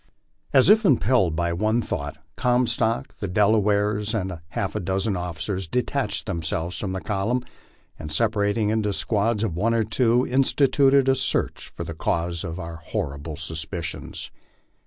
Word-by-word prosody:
As 130 -2 +5
if 215 +3 +6
impelled 120 - +3
by 85 +1 0
one 110 +6 +1
thought, 75 -10 -4 0.2
Comstock, 120 0 +1
the 100 - -3
Delawares, 105 +2 +2
and 95 -5 -3
half 80 - -3
a - - 0
dozen 95 +3 -1
officers, 90 +2 -3
detached 125 - -1
themselves 85 +1 -2
from 95 -3 -3
the 95 - -3
column 105 +5 0 0.6
and, 75 -1 -6
separating 105 +2 +1
into 105 -2 0
squads 105 +1 0
of 95 -8 -1
one 115 +6 +1
or 115 - +2
two, 120 +3 +2
instituted 135 +1 +3
a 135 - +5
search 130 0 -1
for - - -7
the 80 - -6
cause 85 +1 -1
of 85 +1 -5
our 85 -1 -6
horrible 75 0 -4
suspicions. 80 +2 -5
105 Hz, 150 wpm, -24 LUFS, 85-115 Hz, 0.6 s, if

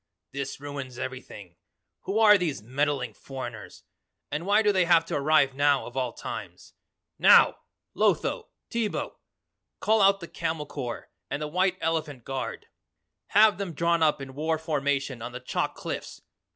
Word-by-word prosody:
"This 140 0 -5
ruins 140 -3 -7
everything. 105 -9 -8 0.5
Who 195 - -1
are 215 -2 +7
these 160 - -1
meddling 130 -1 -1
foreigners? 120 -2 -8 0.5
And 165 +5 -3
why 210 +2 +4
do 210 - +4
they 185 -3 +2
have 165 -1 +4
to - - -3
arrive 145 -1 +3
now 145 0 +2
of 120 - -10
all 130 -2 -1
times? - - -8 0.5
NOW! - - +6 0.3
Lotho! 475 -2 +1 0.2
Teebo! 230 -3 -2 0.6
Call 220 0 +3
out 195 0 +5
the 170 - -8
camel 160 -2 -3
corps 125 -5 -6 0.2
and - - -2
the 150 - -3
white 185 +4 +1
elephant 155 -6 -2
guard. 135 +1 -5 0.6
Have 210 +1 +5
them 195 -4 -4
drawn 170 +1 +1
up 150 -3 +2
in 135 -1 -9
war 160 +3 -1
formation 140 -5 -1
on 120 +1 -6
the 125 - -5
chalk 125 - -2
cliffs. - - -6
150 Hz, 155 wpm, -27 LUFS, 135-175 Hz, 0.6 s, are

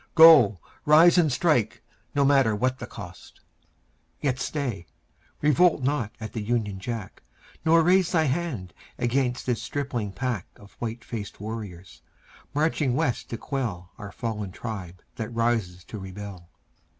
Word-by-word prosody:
Go; 155 - +8 0.3
rise 165 +4 +7
and 155 -4 +3
strike, 125 -5 +1 0.3
no 140 -1 +3
matter 135 -6 +4
what 130 +4 0
the - - -6
cost. - - -11 0.8
Yet 135 -2 -1
stay. 125 - -3 0.5
Revolt 150 0 +4
not 130 -6 0
at 110 -1 -7
the 110 - -3
Union 105 -3 -1
Jack, 110 -1 -6 0.4
Nor 165 +1 +5
raise 180 +1 +4
Thy 160 -3 +3
hand 135 - -2 0.2
against 125 +1 0
this 125 -3 -1
stripling 125 -8 -3
pack 120 -4 -3
Of 100 0 -16
white 115 0 -5
faced 105 -4 -6
warriors, 100 -5 -7 0.5
marching 150 -4 +1
West 125 -2 -1
to 115 - -4
quell 110 -11 -4
Our 105 -2 -7
fallen 105 -4 -4
tribe 95 -4 -7
that 110 -1 -4
rises 115 -7 0
to 105 - -8
rebel. 95 -2 -9
120 Hz, 140 wpm, -26 LUFS, 105-140 Hz, 0.8 s, Go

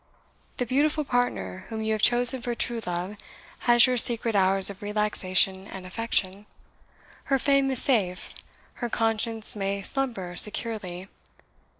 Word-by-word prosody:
The 250 - -2
beautiful 295 +5 0
partner 245 - -3
whom 220 -1 -5
you 220 - -2
have 215 - -3
chosen 245 +2 +3
for 240 0 -4
true 235 -1 -3
love 180 +4 -5 0.5
has 240 -1 +7
your 255 -1 -1
secret 230 -1 +3
hours 195 0 +3
of 200 -1 -7
relaxation 200 -2 0
and 190 -1 -10
affection. 200 -1 -3 0.8
Her 270 - +1
fame 275 0 +1
is 260 -2 +5
safe 195 -9 -1 0.5
her 240 - -3
conscience 225 -1 +1
may 200 -1 -4
slumber 215 -9 -3
securely. 200 -3 +2
220 Hz, 135 wpm, -25 LUFS, 190-240 Hz, 0.8 s, has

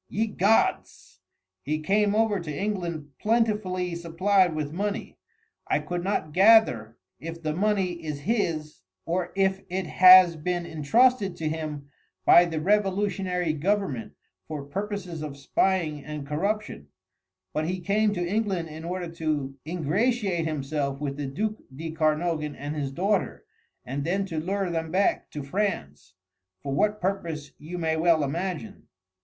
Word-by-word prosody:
"Ye 220 +2 0
gods!" 210 0 0 0.4
"He 155 +6 -2
came 205 +5 +2
over 220 -2 +2
to 165 -3 -6
England 170 -5 -3
plentifully 210 -6 0
supplied 175 +1 +2
with 150 -1 -3
money 205 +3 -3 0.5
I - - +2
could 175 0 -4
not 185 -5 -1
gather 180 - +5 0.2
if 165 +1 -7
the 155 -1 -1
money 185 -2 0
is 150 -2 -4
his 165 -7 -1 0.2
or 175 +1 -1
if 195 0 +1
it 185 +1 -2
has 185 +1 +8
been 175 +2 -2
entrusted 195 - +2
to 160 -2 -3
him 150 -3 -5 0.3
by 175 - +8
the 165 -2 -3
revolutionary 190 -2 +1
government 165 - -1 0.3
for 150 -3 -5
purposes 185 +1 -5
of 145 -2 -6
spying 155 0 0
and 150 -1 -6
corruption 160 - -2 0.7
but 155 +1 -1
he 185 +1 -2
came 205 +4 +1
to 175 -1 -1
England 195 -4 -1
in 155 +1 -9
order 175 +1 -3
to 155 -5 -3
ingratiate 180 - 0
himself 140 -2 -2
with 140 -2 -3
the 145 -2 -3
duc 215 +11 -2 0.2
de 160 +3 -5
Kernogan 155 -1 0
and 145 +2 -5
his 140 -3 -3
daughter, 195 +7 -1 0.4
and 135 +3 -3
then 190 +5 0
to 165 -5 -3
lure 190 +2 -1
them 165 -1 -2
back 190 +4 +1
to 150 - -6
France, 135 - -3 0.5
for 140 - -3
what 210 +9 +1
purpose 170 -6 -3
you 165 +4 -7
may 160 -2 0
well 160 -1 +3
imagine." 160 -3 -4
170 Hz, 145 wpm, -26 LUFS, 150-195 Hz, 0.7 s, has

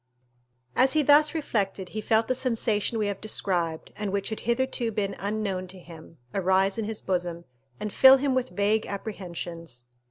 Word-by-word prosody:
As 260 0 +4
he 310 -1 +3
thus 295 +2 +5
reflected, 200 - -2
he 215 - -4
felt 220 +1 +2
the - - +2
sensation 230 -4 0
we 215 - 0
have 200 -1 -3
described, 175 -6 -2
and 210 -2 -3
which 200 0 -1
had 220 - -4
hitherto 240 0 -1
been 205 -2 -2
unknown 200 -2 -2
to 185 +1 -9
him, 165 -1 -13 0.2
arise 190 +2 +2
in 220 - -1
his 215 0 -5
bosom, 175 -2 -2 0.3
and 210 - -4
fill 265 0 +8
him 275 0 0
with 255 0 0
vague 210 +2 +1
apprehensions. 170 - -6
205 Hz, 170 wpm, -26 LUFS, 185-230 Hz, 0.3 s, fill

